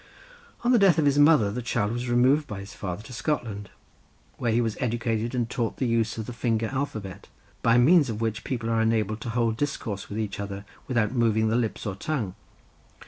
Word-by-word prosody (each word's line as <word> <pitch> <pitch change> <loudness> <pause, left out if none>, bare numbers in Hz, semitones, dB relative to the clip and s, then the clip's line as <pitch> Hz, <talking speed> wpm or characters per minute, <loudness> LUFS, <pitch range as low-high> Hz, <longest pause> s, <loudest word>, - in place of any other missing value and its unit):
On 245 - +3
the 245 - +5
death 195 -5 +5
of 155 - +3
his 145 0 +3
mother 145 -9 +5
the 125 +4 -3
child 105 -3 -1
was 120 +1 -3
removed 130 +5 +3
by 105 -4 -6
his 100 +1 -9
father 95 +1 -5
to 120 - -11
Scotland, 120 -7 -3 0.7
where 120 - 0
he 115 - +2
was 115 -3 0
educated 115 -1 -1
and 120 -2 0
taught 115 -1 -2
the 130 - 0
use 115 -2 0
of 110 - -4
the 125 - -6
finger 115 -1 0
alphabet, 110 -9 -4 0.3
by 115 0 +4
means 145 +3 +5
of 110 -2 -3
which 115 -1 -2
people 115 -3 -3
are 115 0 +2
enabled 110 -1 0
to 115 - -4
hold 115 -1 0
discourse 115 -8 -3
with 105 - -5
each 105 -3 -3
other, 100 0 -5 0.2
without 120 -4 +1
moving 110 -3 +2
the 110 - +1
lips 120 -3 -1
or 105 - -2
tongue. 105 -1 -3
115 Hz, 210 wpm, -26 LUFS, 110-125 Hz, 0.7 s, the